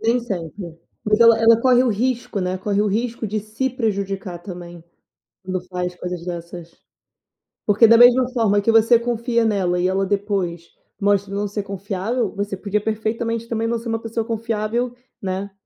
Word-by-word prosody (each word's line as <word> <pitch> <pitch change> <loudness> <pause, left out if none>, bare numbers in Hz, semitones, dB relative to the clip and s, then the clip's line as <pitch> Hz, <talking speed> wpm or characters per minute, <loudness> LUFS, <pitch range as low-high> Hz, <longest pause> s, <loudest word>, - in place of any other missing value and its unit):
Nem 235 +2 +2
sempre. 175 -5 -6 0.3
Porque 210 +2 +3
ela 230 -1 +7
ela 225 0 +5
corre 250 0 +5
o 255 - +1
risco, 235 -1 -1
né, 185 0 -2
corre 200 +1 0
o 210 - 0
risco 225 +2 -2
de 215 +1 -2
se 220 +6 -3
prejudicar 200 -6 -3
também, 175 -2 -10 0.6
quando 185 0 -2
faz 180 -1 -3
coisas 180 -1 -6
dessas, 170 -1 -7 0.9
porque 210 +2 +6
da 230 - +7
mesma 245 +1 +6
forma 220 -5 +2
que 205 - +2
você 225 +1 +5
confia 235 0 0
nela 190 -5 +1
e 180 - +2
ela 190 +1 +1
depois 195 -4 -2 0.3
mostra 200 -1 +1
não 205 +1 -1
ser 205 0 -3
confiável, 200 +4 -3
você 200 0 -3
podia, 205 +2 -1
perfeitamente, 225 +2 -2
também, 225 -1 -1
não 235 +1 0
ser 230 +1 -8
uma 225 0 -1
pessoa 225 0 -3
confiável, 230 +1 -2 0.3
né, 190 +1 -3
210 Hz, 175 wpm, -21 LUFS, 190-230 Hz, 0.9 s, ela